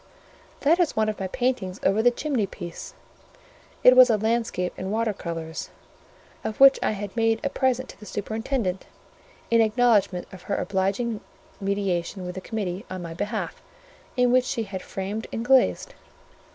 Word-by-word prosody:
"That 320 +5 +4
is 345 -4 +2
one 220 0 +2
of 215 - -4
my 190 - -2
paintings 220 -4 -1
over 200 +3 +3
the 245 - +6
chimney 245 -4 -1
piece." 175 -3 -8 0.9
It 255 - +8
was 255 0 +9
a 220 - +4
landscape 220 -4 -1
in 190 - -5
water 220 +1 0
colours, 165 -3 -5 0.7
of 215 - -4
which 275 0 +8
I - - +1
had 205 0 -6
made 225 -1 +2
a 280 - -1
present 260 -1 0
to - - -12
the 210 - -11
superintendent, 220 -2 -2 0.6
in 230 0 +5
acknowledgment 215 -5 +3
of 185 - -10
her 200 - +1
obliging 205 +4 -1 0.4
mediation 195 -2 -2
with 180 - -5
the 190 - -6
committee 195 -3 -4
on 185 -1 -5
my 165 -1 -6
behalf, 205 +5 -4 0.6
and 250 0 +4
which 255 0 +4
she 230 - -2
had 195 -3 -6
framed 200 +5 -5
and 230 - -3
glazed. 265 0 +3
215 Hz, 165 wpm, -25 LUFS, 190-240 Hz, 0.9 s, was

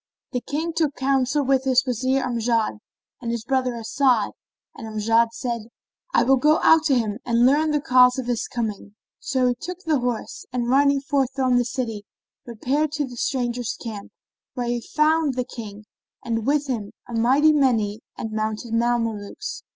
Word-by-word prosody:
The 250 - -2
King 315 +7 -3
took 315 -4 0
counsel 270 +1 +1
with 265 0 +2
his 260 -1 +3
Wazir 255 +2 0
Amjad 230 -2 0 0.4
and 235 - -4
his 235 -1 -3
brother 255 -2 0
As'ad; 235 -1 +1 0.4
and 225 - -8
Amjad 225 +2 +2
said, 235 -3 -4 0.4
"I - - +4
will 265 +2 +4
go 300 +4 +4
out 320 -1 +6
to 275 -5 +3
him 215 -2 -2
and 235 0 +3
learn 295 +4 +3
the 300 -1 +1
cause 250 -1 +5
of 260 - -3
his 240 -2 -1
coming." 210 -3 -4 0.2
So 260 -2 +1
he - - +2
took 360 +9 -8
horse 250 -7 -2
and, 245 -2 -2
riding 280 +2 +3
forth 275 -2 0
from 255 -2 +2
the 245 - +1
city, 230 -4 -4 0.4
repaired 270 +6 -1
to 295 -1 -1
the 250 -2 -10
stranger's 245 -2 -2
camp, 215 -4 -7 0.4
where 245 -2 -2
he 240 0 -1
found 305 0 +1
the 250 -1 -1
King 215 -4 -9 0.4
and 230 -1 -2
with 290 0 +2
him 225 -7 -4
a 240 - -8
mighty 265 +7 +4
many 225 -7 +2 0.2
and 225 - -5
mounted 215 +1 -3
Mamelukes. 230 - -1
250 Hz, 175 wpm, -23 LUFS, 230-275 Hz, 0.4 s, out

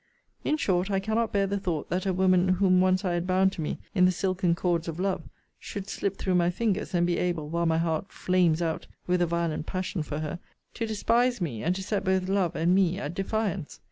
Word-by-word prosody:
In 305 - +1
short, 185 -8 +1
I 195 -1 +1
cannot 220 +2 0
bear 200 -1 +2
the 200 +1 -1
thought, 175 -6 -3
that 185 +2 -1
a - - +2
woman 185 0 +3
whom 185 -1 +4
once 185 +1 +2
I 180 - +1
had 175 +1 -1
bound 190 +1 +3
to 170 - -6
me 150 - -2 0.2
in 180 -2 +5
the 185 - +5
silken 185 -1 0
cords 170 -1 0
of 165 +1 -5
love, 190 0 -2 0.3
should 200 -1 -6
slip 200 -1 -2
through 190 - -1
my 175 -1 +3
fingers, 205 0 -1
and 175 0 +3
be 175 0 0
able, 170 -4 -1
while 170 +1 0
my 160 0 +2
heart 165 +2 -1
flames 175 -3 +2
out 160 -1 -2 0.2
with 180 0 +1
a 175 - +3
violent 170 -2 -1
passion 185 -1 -2
for 150 0 -4
her, 155 +2 -4 0.3
to 230 - -3
despise 235 +3 +1
me, 135 - -3
and 175 +3 0
to 190 - -4
set 200 +1 -1
both 190 -1 +1
love 190 -3 +1
and 170 +2 +2
me 185 -1 +3
at 150 -3 -4
defiance. 195 -3 -2
185 Hz, 235 wpm, -27 LUFS, 170-195 Hz, 0.3 s, in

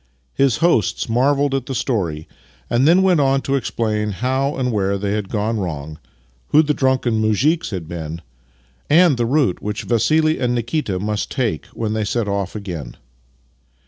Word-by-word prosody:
His 135 -3 +2
hosts 170 -11 +1
marvelled 135 +4 +2
at 135 -2 -2
the 135 - -3
story, 90 - -2 0.4
and 125 +4 +3
then 180 +4 +5
went 185 -4 +4
on 135 -1 +2
to 135 - -2
explain 110 -4 -1
how 130 +6 -1
and 125 -2 -1
where 100 -2 0
they 100 0 -2
had 105 -2 -2
gone 110 +1 -1
wrong, 75 -4 -5 0.5
who 155 - +5
the 150 -1 +1
drunken 130 -5 +1
muzhiks 140 - +1
had 90 -6 -5
been, 80 -1 -6 0.7
and 165 -1 +5
tlie 120 -1 -1
route 135 - +1
which 105 0 -4
Vassili 155 +7 +2
and 125 0 0
Nikita 120 -4 -2
must 105 +2 -2
take 115 - -2
when 110 -2 -4
they 110 -1 -1
set 110 +1 -1
off 100 -1 -2
again. 90 - -6
115 Hz, 170 wpm, -20 LUFS, 100-135 Hz, 0.7 s, then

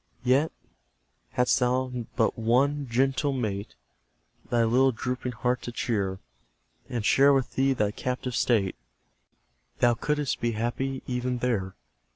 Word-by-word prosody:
Yet, 135 +5 +3 0.8
hadst 125 0 +3
thou 125 +1 +1 0.2
but 115 -3 +2
one 135 +5 +1
gentle 135 +4 +1
mate 105 -6 -3 0.7
Thy 120 -1 +3
little 130 +4 +4
drooping 125 +1 -3
heart 125 +1 -1
to 120 - -6
cheer, 100 -6 -1 0.7
And 115 -4 -3
share 140 +6 +6
with 135 -2 0
thee 135 +1 +2
thy 105 -5 0
captive 125 +2 -3
state, 105 -6 +2 1.0
Thou 120 0 +4
couldst 150 +3 -1
be 120 0 0
happy 130 +4 -2
even 125 0 -2
there. 110 -7 -1
125 Hz, 130 wpm, -27 LUFS, 115-130 Hz, 1.0 s, share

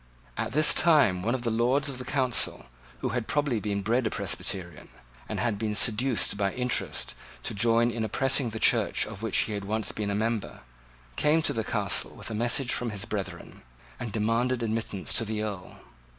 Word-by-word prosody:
At - - -3
this 155 +2 +6
time 140 - +4
one 115 +6 0
of 125 - -5
the 115 - 0
Lords 125 +6 +2
of 135 -3 -4
the 125 - -6
Council, 130 -2 0 0.4
who - - -1
had 120 -2 -3
probably 145 -6 0
been 100 -1 -3
bred 115 +3 +1
a - - 0
Presbyterian, 90 -6 -3 0.4
and - - -3
had 115 -4 -1
been 105 -1 -2
seduced 115 0 +3
by 100 -2 0
interest 125 -1 -1 0.3
to - - -3
join 115 +3 +3
in 115 -1 -3
oppressing 135 +3 +1
the 110 - -6
Church - - +3
of 105 -1 -8
which 115 -3 0
he 110 - +2
had 100 -1 -4
once 110 +1 -1
been 105 -2 -3
a 100 - -1
member, 110 0 -2 0.6
came 155 +2 +3
to - - +4
the 115 - -2
Castle 105 -3 -1
with - - -7
a - - -3
message 120 +4 +1
from 120 - -1
his 100 -2 -4
brethren, 100 -3 -6 0.4
and 120 -3 -5
demanded 115 +3 0
admittance 110 -3 -1
to 115 - +3
the 110 -1 -3
Earl. 100 -4 -6
115 Hz, 195 wpm, -27 LUFS, 105-125 Hz, 0.6 s, this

